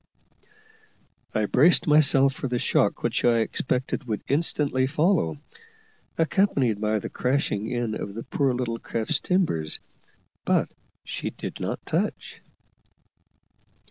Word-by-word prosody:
I 110 - +2
braced 145 - +4
myself 140 -3 +5
for 135 - -4
the 125 -1 -1
shock - - +1
which - - 0
I 120 -1 +4
expected 130 +4 -2
would 110 -4 -3
instantly 140 -3 +1
follow, 150 - +1 0.8
accompanied 145 - +1
by 110 0 +1
the 105 - -4
crashing 125 -5 -1
in 120 -3 -2
of 100 -2 -5
the 115 - -5
poor 140 -2 0
little 120 -2 -2
craft's 115 +7 -2
timbers, 160 - 0 0.6
but - - +1 0.3
she - - -4
did - - -7
not - - -4
touch. - - -3
125 Hz, 120 wpm, -25 LUFS, 110-150 Hz, 0.8 s, myself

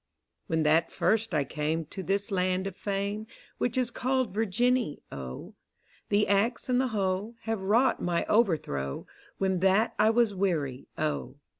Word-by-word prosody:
When 160 -1 +1
that 160 +2 +3
first 225 0 +1
I 155 -4 +2
came 155 +3 -2
To 190 +5 -7
this 200 +3 -1
land 185 0 +1
of 195 -2 -4
Fame, 200 +2 -3 0.3
Which 245 +1 0
is 250 -2 +1
called 255 -4 0
Virginny, 225 - +1
O: 65 -2 -7 0.6
The 205 +1 +3
Axe 220 +6 +1
and 250 0 +3
the 260 - +1
Hoe 205 0 -1
Have 225 -3 -2
wrought 230 +7 +3
my 175 -1 0
overthrow. 155 - 0 0.3
When 190 -2 +1
that 195 +5 +3
I 215 +1 +5
was 225 -2 +3
weary, 155 -9 -1
O. 150 -4 -2
195 Hz, 155 wpm, -28 LUFS, 165-225 Hz, 0.6 s, I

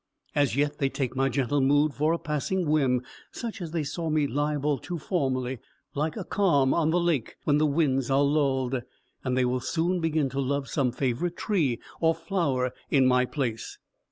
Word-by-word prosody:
As 145 -5 +2
yet, 145 +1 0
they 135 -2 +2
take 130 -2 -3
my 135 +1 +2
gentle 140 +1 0
mood 145 +2 +3
for 150 +3 +1
a 170 - +1
passing 160 +4 -2
whim, 135 -5 +2 0.3
such 230 -4 -6
as 170 - -4
they 160 -1 -1
saw 160 +3 -3
me 155 -1 +2
liable 145 +1 0
to 175 +6 -5
formerly, 130 - -1 0.3
like 150 +2 -2
a - - -3
calm 145 -10 +2
on 160 -2 +2
the 175 +2 +2
lake 170 -9 0
when 145 0 +3
the 155 - +3
winds 140 -4 +1
are 135 +1 +3
lulled; 135 -3 +1 0.4
and 130 -1 -1
they 130 - +3
will 125 +1 0
soon 170 +7 0
begin 160 -3 +1
to 135 +2 -4
love 140 +1 -1
some 135 -4 0
favourite 135 +7 -2
tree 155 - 0 0.2
or 165 0 +3
flower 160 -7 -1 0.2
in 135 -2 +4
my 125 0 +4
place. 120 -5 -3
145 Hz, 190 wpm, -27 LUFS, 130-160 Hz, 0.4 s, in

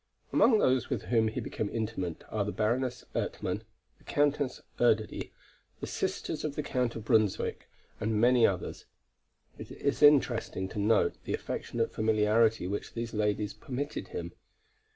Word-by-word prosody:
Among 225 - +5
those 130 - +2
with - - -2
whom 115 -2 +2
he 110 - -3
became 105 - -3
intimate 105 -7 -3
are 105 -2 0
the 105 - -3
Baroness 125 +4 -1
Ertmann, - - -2 0.4
the - - -23
Countess 145 -2 0 0.2
Erdödy, 110 -3 +1 0.5
the - - -4
sisters 160 - -3
of 150 -2 -3
the 150 - -2
Count 125 -4 -1
of 110 -2 -6
Brunswick 110 -4 +1 0.3
and 110 0 0
many 120 0 +6
others. 95 -2 -4 0.7
It - - -8
is 140 - -2
interesting 130 -9 +4
to 105 - -5
note 105 +2 +3
the - - 0
affectionate 115 -1 -3
familiarity 110 -1 +3
which 100 +3 -4
these 115 0 -4
ladies 105 -1 0
permitted 130 +7 -5
him. - - -6
115 Hz, 150 wpm, -30 LUFS, 105-125 Hz, 0.7 s, many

